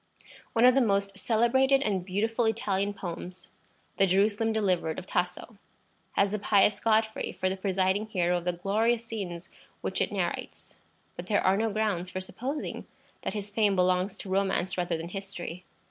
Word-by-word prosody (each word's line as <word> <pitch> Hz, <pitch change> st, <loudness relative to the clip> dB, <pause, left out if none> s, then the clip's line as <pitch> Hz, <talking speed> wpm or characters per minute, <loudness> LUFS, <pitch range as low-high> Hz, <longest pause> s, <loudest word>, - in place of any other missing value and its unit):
One 230 Hz, +2 st, +4 dB
of 250 Hz, -, +8 dB
the 270 Hz, -, +4 dB
most 200 Hz, -3 st, +1 dB
celebrated 265 Hz, +4 st, +3 dB
and 195 Hz, -4 st, 0 dB
beautiful 220 Hz, +5 st, 0 dB
Italian 205 Hz, -3 st, 0 dB
poems, 180 Hz, -2 st, -7 dB, 0.5 s
the 195 Hz, -, +5 dB
"Jerusalem 205 Hz, +4 st, +2 dB
Delivered" 185 Hz, -7 st, 0 dB
of 185 Hz, -, -6 dB
Tasso, 180 Hz, +4 st, -3 dB, 0.5 s
has 200 Hz, 0 st, +2 dB
"the 210 Hz, -, -1 dB
pious 200 Hz, 0 st, +3 dB
Godfrey" 220 Hz, -1 st, +1 dB
for 185 Hz, 0 st, -1 dB
the 190 Hz, -, -2 dB
presiding 190 Hz, +2 st, 0 dB
hero 180 Hz, -4 st, +1 dB
of 170 Hz, -, -12 dB
the 180 Hz, -, +2 dB
glorious 220 Hz, +6 st, +1 dB
scenes 190 Hz, -6 st, -6 dB, 0.3 s
which -, -, -2 dB
it -, -, 0 dB
narrates. -, -, -4 dB, 0.4 s
But 175 Hz, -, -7 dB
there 205 Hz, -, +1 dB
are 190 Hz, +1 st, +5 dB
no 220 Hz, +2 st, +1 dB
grounds 200 Hz, -4 st, -1 dB
for 185 Hz, -, -4 dB
supposing 255 Hz, +10 st, -5 dB, 0.3 s
that -, -, -3 dB
his 205 Hz, -1 st, -4 dB
fame 205 Hz, -2 st, +2 dB
belongs 185 Hz, +1 st, +2 dB
to 195 Hz, -, -7 dB
romance 190 Hz, -1 st, +1 dB
rather 175 Hz, -2 st, -1 dB
than 165 Hz, +1 st, -6 dB
history. 185 Hz, -2 st, -6 dB
200 Hz, 170 wpm, -28 LUFS, 185-220 Hz, 0.5 s, of